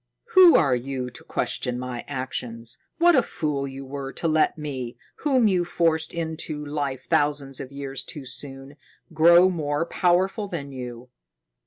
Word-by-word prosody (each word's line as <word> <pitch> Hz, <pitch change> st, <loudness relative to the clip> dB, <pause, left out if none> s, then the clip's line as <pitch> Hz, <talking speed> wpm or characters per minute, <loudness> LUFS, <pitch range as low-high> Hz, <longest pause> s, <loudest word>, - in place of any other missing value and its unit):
"Who 370 Hz, -4 st, +8 dB
are 140 Hz, -6 st, +4 dB
you 125 Hz, 0 st, -4 dB
to -, -, -11 dB
question 125 Hz, 0 st, -2 dB
my 125 Hz, -1 st, -5 dB
actions? 125 Hz, -4 st, -4 dB, 0.2 s
What 345 Hz, 0 st, +5 dB
a 265 Hz, -, +6 dB
fool 145 Hz, -9 st, -2 dB
you 135 Hz, 0 st, -8 dB
were 135 Hz, 0 st, -6 dB
to 165 Hz, -, -1 dB
let 155 Hz, 0 st, +2 dB
me, 130 Hz, -6 st, -5 dB, 0.2 s
whom 260 Hz, -6 st, +3 dB
you 185 Hz, -3 st, +2 dB
forced 165 Hz, -2 st, +1 dB
into 160 Hz, -2 st, -4 dB
life 140 Hz, -3 st, -3 dB
thousands 145 Hz, -2 st, 0 dB
of 130 Hz, -, -7 dB
years 140 Hz, -1 st, -3 dB
too 150 Hz, -6 st, -7 dB
soon, 135 Hz, +2 st, -6 dB, 0.4 s
grow 170 Hz, +3 st, +7 dB
more 155 Hz, -3 st, -1 dB
powerful 190 Hz, +4 st, +1 dB
than 150 Hz, -7 st, -5 dB
you! 125 Hz, -1 st, -8 dB
145 Hz, 155 wpm, -24 LUFS, 130-170 Hz, 0.4 s, Who